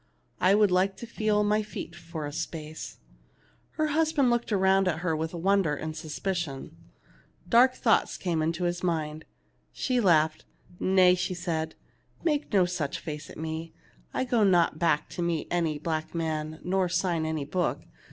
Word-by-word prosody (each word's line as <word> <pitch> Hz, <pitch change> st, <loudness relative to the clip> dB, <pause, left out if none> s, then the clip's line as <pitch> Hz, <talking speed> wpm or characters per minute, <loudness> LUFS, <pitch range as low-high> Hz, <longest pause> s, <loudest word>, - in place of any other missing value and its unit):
I 190 Hz, +2 st, +5 dB
would 210 Hz, -2 st, +4 dB
like 190 Hz, +2 st, +2 dB
to -, -, -7 dB
feel 215 Hz, -2 st, +1 dB
my 210 Hz, +1 st, +2 dB
feet 210 Hz, -5 st, -7 dB
for 165 Hz, -3 st, -6 dB
a 145 Hz, -, -6 dB
space." 160 Hz, -1 st, -6 dB, 0.8 s
Her 310 Hz, -1 st, 0 dB
husband 305 Hz, -4 st, +2 dB
looked 240 Hz, -1 st, 0 dB
around 190 Hz, -1 st, +3 dB
at 160 Hz, -2 st, -1 dB
her 170 Hz, -3 st, 0 dB
with 160 Hz, +2 st, -3 dB
won 195 Hz, +4 st, +3 dB
der 150 Hz, -5 st, 0 dB
and 155 Hz, +2 st, -5 dB
suspicion. 155 Hz, -, -4 dB, 0.7 s
Dark 250 Hz, +5 st, +5 dB
thoughts 225 Hz, -3 st, +2 dB
came 170 Hz, -4 st, -1 dB
into 165 Hz, +3 st, -1 dB
his 175 Hz, 0 st, -1 dB
mind. 155 Hz, -3 st, -2 dB, 0.5 s
She 255 Hz, -2 st, 0 dB
laughed. 160 Hz, -7 st, +3 dB, 0.4 s
"Nay," 185 Hz, -1 st, +5 dB
said 175 Hz, -3 st, -2 dB
she, -, -, -34 dB
"make 300 Hz, -3 st, 0 dB
no 190 Hz, -3 st, +4 dB
such 175 Hz, -6 st, -2 dB
face 150 Hz, -1 st, -7 dB
at -, -, -11 dB
me. 160 Hz, +1 st, -5 dB, 0.4 s
I -, -, -1 dB
go 245 Hz, -3 st, +2 dB
not 175 Hz, -5 st, +3 dB
back 165 Hz, -3 st, +2 dB
to -, -, -5 dB
meet 170 Hz, -2 st, -1 dB
any 165 Hz, -3 st, 0 dB
black 155 Hz, +1 st, -3 dB
man 155 Hz, -1 st, -2 dB
nor 185 Hz, 0 st, +1 dB
sign 175 Hz, -2 st, 0 dB
any 160 Hz, -2 st, -2 dB
book. 175 Hz, +4 st, -1 dB
175 Hz, 170 wpm, -28 LUFS, 160-195 Hz, 0.8 s, I